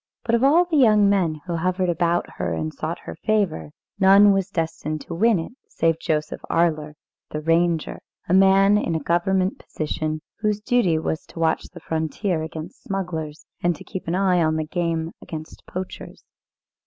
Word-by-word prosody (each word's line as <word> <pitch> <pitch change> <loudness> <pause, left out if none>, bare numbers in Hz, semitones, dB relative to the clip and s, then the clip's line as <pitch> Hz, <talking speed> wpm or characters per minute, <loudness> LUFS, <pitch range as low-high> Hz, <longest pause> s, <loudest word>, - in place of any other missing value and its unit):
But 235 -1 -1
of 235 +2 +3
all 320 +6 +5
the 335 -3 0
young 215 -6 +5
men 175 -6 +1
who 170 -2 -2
hovered 185 +2 0
about 175 0 +1
her, 85 - -1
and 80 -1 -3
sought - - -4
her 80 - -8
favour, 205 -9 0 0.3
none 200 +1 +7
was 195 -1 0
destined 155 -2 -3
to - - -7
win 220 +5 +3
it 165 - -5 0.2
save 165 0 0
Joseph 155 -2 -2
Arler, 155 -3 +1 0.4
the 150 - -4
ranger, 165 +1 +1 0.3
a 170 - +1
man 195 +2 +5
in 170 -5 -1
a - - +1
government 185 +4 0
position, 155 0 -3 0.2
whose 210 -1 0
duty 210 -7 +2
was 160 0 -2
to - - -16
watch 160 -1 +1
the - - -12
frontier 160 +2 -2
against 160 +2 -7
smugglers, 165 -6 -4 0.2
and 175 -1 +1
to - - -12
keep 190 -4 -7
an 170 - 0
eye 185 -2 +3
on 155 -1 +2
the 155 0 -1
game 165 0 -2
against 155 -1 -8
poachers. 185 +1 -7
175 Hz, 180 wpm, -23 LUFS, 160-195 Hz, 0.4 s, none